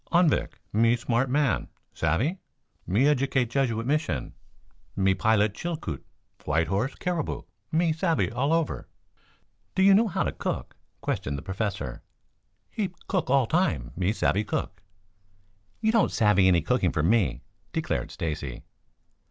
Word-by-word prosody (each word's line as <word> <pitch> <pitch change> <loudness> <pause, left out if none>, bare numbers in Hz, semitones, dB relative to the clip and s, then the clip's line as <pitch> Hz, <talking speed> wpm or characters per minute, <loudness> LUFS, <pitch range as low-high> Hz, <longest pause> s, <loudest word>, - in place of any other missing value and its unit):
"Anvik. 170 -3 +3 0.2
Me 115 +3 +4
smart 120 +2 0
man, 140 -1 +1 0.3
savvy? 135 - 0 0.5
Me 115 +10 +3
educate 135 -4 +1
Jesuit 115 -4 0
Mission. 130 - -1 0.6
Me 95 0 +3
pilot 105 +1 +2
Chilkoot, 150 - -4 0.4
White 80 0 +1
Horse, 105 +8 0
Caribou; 175 -4 -2 0.3
me 165 0 +2
savvy 165 - +1
all 130 +6 0
over." 165 -2 0 0.9
"Do 190 - +3
you 195 0 +7
know 220 +4 +5
how 190 - 0
to - - -1
cook?" - - -4 0.3
questioned 70 +1 -2
the 70 - -7
Professor. 95 - -3 0.7
"Heap 195 -4 -3
cook 185 -8 -1
all 135 -1 +4
time. 110 - 0
Me 90 +2 +1
savvy 105 -1 +1
cook." 95 -3 -3 1.0
"You 220 - +3
don't 230 -4 +3
savvy 105 -4 +4
any 90 -2 +4
cooking 95 -2 +2
for 75 - 0
me," 105 +3 +2 0.3
declared - - -2
Stacy. 75 -6 -4
115 Hz, 135 wpm, -27 LUFS, 95-160 Hz, 1.0 s, you